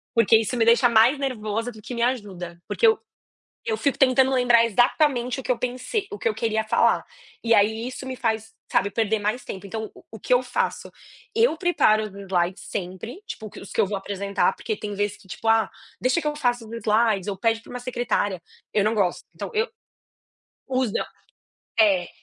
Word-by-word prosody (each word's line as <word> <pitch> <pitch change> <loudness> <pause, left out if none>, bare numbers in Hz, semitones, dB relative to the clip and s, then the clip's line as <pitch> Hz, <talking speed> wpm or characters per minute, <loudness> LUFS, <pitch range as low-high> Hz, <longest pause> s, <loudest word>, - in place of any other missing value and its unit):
Porque 230 -1 +6
isso 225 +3 -1
me 225 - +3
deixa 235 +2 +6
mais 235 +5 +5
nervosa 230 -4 -2
do 215 -2 -13
que 245 - -7
me 235 - -3
ajuda. 195 -8 -2
Porque 470 - +3
eu 445 -1 +4 0.6
eu 455 -2 -1
fico 285 -8 0
tentando 265 -1 +4
lembrar 245 -2 +5
exatamente 245 +3 +2
o - - -4
que 255 - +1
eu 240 - -4
pensei 255 - -3
o 415 - -6
que - - -8
eu 440 - -2
queria 220 -1 0
falar. 220 - +2 0.4
E 230 - +3
aí 220 +3 +2
isso 260 +1 -8
me 260 0 -5
faz, 225 -2 -2 0.2
sabe, 200 - +2
perder 220 0 +1
mais 210 +4 -2
tempo 195 +1 -7
então 220 +2 -5 0.2
o 220 - -9
que 215 - -3
eu 250 0 +5
faço? 250 - -2 0.4
Eu 450 -7 +3
preparo 275 - +3
os - - -4
slides 190 -2 -1
sempre, 195 - -6
tipo 220 - -7
que - - -11
os 195 - -11
que - - -8
eu - - +3
vou 200 +1 -2
apresentar, 200 0 0
porque 435 - -3
tem 205 - -5
vezes 205 0 -2
que 205 -2 -20
tipo: 225 - -7
"Ah, 225 -2 +3 0.3
deixa 255 +7 +1
que - - -5
eu 300 - 0
faça 245 -5 0
os 220 - -11
slides, 220 -3 +1
ou 200 - -2
pede 225 +2 +1
para - - -19
uma 250 - -6
secretária", 240 -7 -1 0.3
eu 210 - +3
não 215 +2 +1
gosto. 195 -5 0
Então - - -6
eu, 445 0 +1
quando 455 - -30 1.1
você 240 - 0
usa, - - -3 0.7
é, 195 -5 +4
225 Hz, 210 wpm, -24 LUFS, 205-255 Hz, 1.1 s, Porque